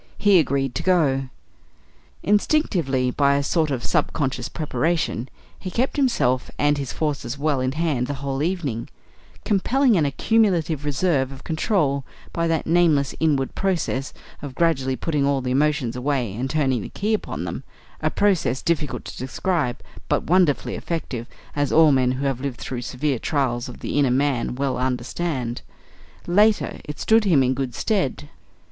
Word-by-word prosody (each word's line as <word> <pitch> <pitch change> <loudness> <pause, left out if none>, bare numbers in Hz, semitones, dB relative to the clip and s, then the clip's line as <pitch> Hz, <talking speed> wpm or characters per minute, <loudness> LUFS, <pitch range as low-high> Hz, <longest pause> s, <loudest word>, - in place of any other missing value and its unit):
He 200 -3 +5
agreed 135 -3 0
to - - -3
go. 140 -8 +2 0.9
Instinctively, 180 - +1
by 140 +1 +3
a 140 - +1
sort 155 +2 +1
of 130 -4 -2
sub - - +1
conscious 130 -4 -2
preparation, 155 -3 -1 0.3
he 185 - -5
kept 245 +8 -1
himself 130 - +1
and 145 0 +2
his 135 -3 -4
forces 150 -2 -2
well 145 -1 0
in 130 +1 -1
hand 150 -6 0
the 145 - -3
whole 135 0 -3
evening, 150 -9 -2 0.6
compelling 240 +5 +3
an 155 - +2
accumulative 170 -3 +1
reserve 145 -2 +1
of 135 0 -11
control 155 -5 0 0.3
by 170 0 0
that 165 -2 0
nameless 160 -4 +3
inward 145 -4 +1
process 170 -8 -1 0.3
of 140 -3 -7
gradually 135 -6 +1
putting 145 +3 -1
all 140 0 +2
the 125 -1 -3
emotions 135 -3 +1
away 125 -5 -1
and 125 +5 -3
turning 135 -5 +1
the - - -7
key 210 +2 -1
upon 215 - -3
them - - -5 0.4
a - - +2
process 160 -11 +1
difficult 160 -3 -1
to - - -8
describe, 135 0 -1 0.3
but - - +1
wonderfully 175 -4 +2
effective, 135 -8 -4 0.3
as 145 -1 0
all 160 -1 +6
men 130 -2 +3
who 135 +2 -3
have 135 -2 -1
lived 140 -3 -4
through 125 -2 -4
severe 130 +1 -2
trials 130 -5 -1
of 125 - -11
the - - -1
inner 140 -3 +3
man 130 -2 +1
well 130 -1 -1
understand. 125 0 -2 0.6
Later, 210 +4 +2
it 150 - -7
stood 220 0 +4
him 165 -10 +4
in 130 0 +2
good 130 -2 -3
stead. 185 - -1
140 Hz, 165 wpm, -23 LUFS, 130-170 Hz, 0.9 s, all